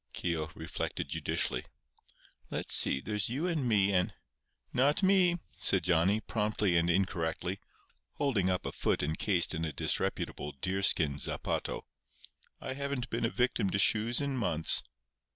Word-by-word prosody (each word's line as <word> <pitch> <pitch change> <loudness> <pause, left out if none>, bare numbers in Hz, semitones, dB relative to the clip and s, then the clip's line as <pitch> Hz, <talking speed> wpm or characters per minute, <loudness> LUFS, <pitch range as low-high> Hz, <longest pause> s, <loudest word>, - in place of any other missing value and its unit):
Keogh 80 -3 -2
reflected 80 0 -5
judicially. - - -1 0.9
"Let's - - -1
see—there's 100 +11 +4
you 140 +8 -2
and 155 -8 -1
me 100 -2 +3
and—" 90 -1 0 0.6
"Not 145 +8 +2
me," 185 -2 +4
said 95 -3 +3
Johnny, 90 +4 +2
promptly 105 -4 -1
and 85 +1 +2
incorrectly, 90 0 -1 0.5
holding 115 -11 0
up 90 -1 -1
a - - -3
foot - - -1
encased 85 +5 +1
in 80 0 -3
a 80 - -2
disreputable 75 0 -2
deerskin 85 -3 +2
zapato. - - -2 0.8
"I - - -5
haven't 140 -2 -4
been 115 0 -1
a - - 0
victim 120 -5 0
to 95 - -1
shoes 110 +4 +3
in 140 -2 -2
months." 80 -9 +3
100 Hz, 135 wpm, -31 LUFS, 85-125 Hz, 0.9 s, see—there's